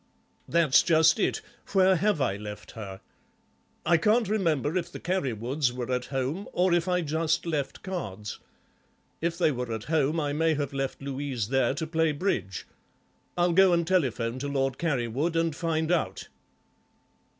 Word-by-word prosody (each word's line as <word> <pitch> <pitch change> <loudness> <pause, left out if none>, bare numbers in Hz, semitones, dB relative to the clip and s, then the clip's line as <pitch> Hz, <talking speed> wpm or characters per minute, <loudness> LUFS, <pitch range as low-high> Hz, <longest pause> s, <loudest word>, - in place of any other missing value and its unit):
"That's 165 -5 +4
just 165 +3 +4
it. - - 0 0.3
Where 190 -1 +5
have 205 -1 +1
I 110 -7 +1
left 105 0 -8
her? 100 -4 -8 0.8
I 170 - +5
can't 215 +6 +3
remember 165 - 0
if 175 -1 -2
the - - -7
Carrywoods 135 - -1
were 125 0 -4
at 125 0 -1
home 140 +9 -3
or 180 0 +2
if 175 0 +2
I 180 -1 +2
just 160 +1 0
left 150 -5 -3
cards. 105 - -5 0.8
If 170 +1 -1
there 160 -4 +3
were 125 -2 -4
at 110 -1 -3
home 155 +1 +2
I 145 -2 -1
may 160 +1 +2
have 145 -1 -3
left 135 0 -3
Louise 135 -5 -3
there 135 0 +2
to 160 - -3
play 160 -1 +1
bridge. 130 - -2 0.7
I'll 175 0 +3
go 190 0 +6
and 170 -1 +2
telephone 130 -9 0
to 145 - -3
Lord 135 -2 -1
Carrywood 145 +1 -1
and 165 -2 +1
find 160 0 -1
out." 130 - -1
155 Hz, 160 wpm, -27 LUFS, 130-170 Hz, 0.8 s, go